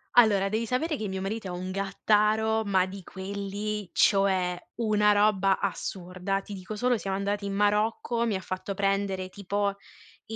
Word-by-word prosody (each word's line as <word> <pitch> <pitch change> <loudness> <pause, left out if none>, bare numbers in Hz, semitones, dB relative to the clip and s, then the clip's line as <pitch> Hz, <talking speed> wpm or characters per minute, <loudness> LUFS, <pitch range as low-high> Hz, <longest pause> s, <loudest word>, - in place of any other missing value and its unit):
Allora, 205 -5 +6
devi 220 +3 -1
sapere 300 +6 0
che 215 -5 -4
mio 190 0 -4
marito 205 +1 -3
è - - -5
un 180 +1 -4
gattaro, 215 +3 +2
ma 190 -2 +3
di 190 +1 -8
quelli, 200 +2 -4
cioè 190 -3 +3 0.2
una 210 -2 +3
roba 205 -2 +3
assurda. 185 0 -3
Ti 205 - -9
dico 195 +2 -6
solo 245 0 +1
siamo 195 0 -2
andati 200 +1 -2
in 200 - -3
Marocco, 210 +3 +1
mi 210 - 0
ha - - -1
fatto 190 +1 -5
prendere 195 -1 0
tipo 200 +1 -1 0.5
i 225 - -5
200 Hz, 170 wpm, -28 LUFS, 190-215 Hz, 0.5 s, Allora